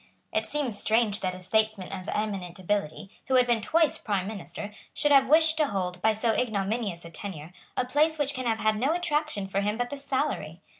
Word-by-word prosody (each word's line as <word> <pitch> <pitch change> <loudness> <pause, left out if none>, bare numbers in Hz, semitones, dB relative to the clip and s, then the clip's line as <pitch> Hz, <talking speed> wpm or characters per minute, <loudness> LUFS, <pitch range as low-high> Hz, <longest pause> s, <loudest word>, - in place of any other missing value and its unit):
It 220 0 +1
seems 265 -6 0
strange 220 -2 +2
that 185 -2 -2
a - - -9
statesman 215 0 0
of 190 0 -6
eminent 195 -5 -3
ability, 195 0 -2 0.2
who 260 - +2
had 250 -1 +6
been 240 -2 +1
twice 320 +7 +2
Prime 200 -4 -1
Minister, 205 0 -5 0.2
should 295 - +1
have 270 -1 +6
wished 315 +1 +5
to 305 -2 +3
hold, 180 -4 -3
by 220 - +4
so 220 +1 +1
ignominious 205 -5 -1
a 170 - -9
tenure, 170 -2 -7 0.2
a 255 - +1
place 305 +5 +2
which 285 -1 0
can 255 -2 -3
have 225 -1 +1
had 215 0 +2
no 280 +7 +2
attraction 305 - -1
for 195 +1 -1
him 210 +2 -1
but 245 0 -2
the 285 - -4
salary. 265 - -2
220 Hz, 210 wpm, -27 LUFS, 195-270 Hz, 0.2 s, had